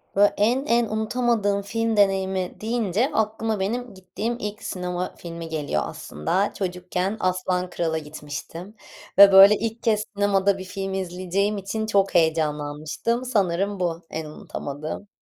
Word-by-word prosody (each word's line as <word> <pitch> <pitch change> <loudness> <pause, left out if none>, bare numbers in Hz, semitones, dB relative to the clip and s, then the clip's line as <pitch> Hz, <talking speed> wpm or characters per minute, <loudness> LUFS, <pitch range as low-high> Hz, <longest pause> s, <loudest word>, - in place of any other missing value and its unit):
Böyle 205 +1 +5
en 245 +7 +2
en 235 0 +3
unutamadığım 220 -2 0
film 225 +1 -1
deneyimi 190 -2 +1
deyince 225 +1 0
aklıma 220 0 0
benim 235 +4 -2
gittiğim 195 +5 -4
ilk 210 0 -5
sinema 180 0 -4
filmi 165 -1 -8
geliyor 145 - -1
aslında. 180 - -2
Çocukken 180 +2 -2
“Aslan 185 -1 0
Kral”a 165 -2 -1
gitmiştim 155 +5 -8 0.4
ve 200 0 +10
böyle 195 +2 +9
ilk 230 +2 -4
kez 215 -2 +2
sinemada 200 -1 +2
bir 190 - -6
film 195 +1 -5
izleyeceğim 190 +2 -1
için 200 +3 -3
çok 200 -2 +1
heyecanlanmıştım. 155 +7 0
Sanırım 200 -4 0
bu, 170 -1 -1
en 160 0 -4
unutamadığım. 150 +4 -6
195 Hz, 135 wpm, -24 LUFS, 175-215 Hz, 0.4 s, ve